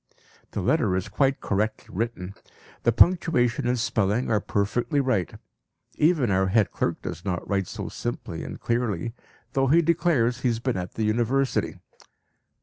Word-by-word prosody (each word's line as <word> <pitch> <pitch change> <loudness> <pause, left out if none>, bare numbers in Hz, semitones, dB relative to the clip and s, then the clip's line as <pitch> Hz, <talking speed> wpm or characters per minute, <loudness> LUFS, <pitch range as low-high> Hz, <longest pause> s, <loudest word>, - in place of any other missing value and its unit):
(The - - -2
letter 90 - +2
is 95 +2 -2
quite 135 +6 +1
correctly 105 +2 -2
written. 100 -3 -3 0.5
The 120 - +3
punctuation 125 -4 +3
and 125 +1 +1
spelling 110 0 0
are 105 - +3
perfectly 120 - 0
right. 130 - 0 0.6
Even 150 - +2
our 95 0 +2
head 105 +1 +2
clerk - - -2
does - - -6
not 90 -2 -3
write 100 -3 0
so - - -6
simply - - -5
and - - -7
clearly, 115 -4 -1 0.4
though 135 0 +2
he 165 +5 +5
declares 150 -7 +2
he 130 - 0
has 115 -2 +1
been 125 +1 -1
at 90 -1 -5
the 110 - -1
University. 120 +5 0
115 Hz, 155 wpm, -25 LUFS, 100-130 Hz, 0.6 s, he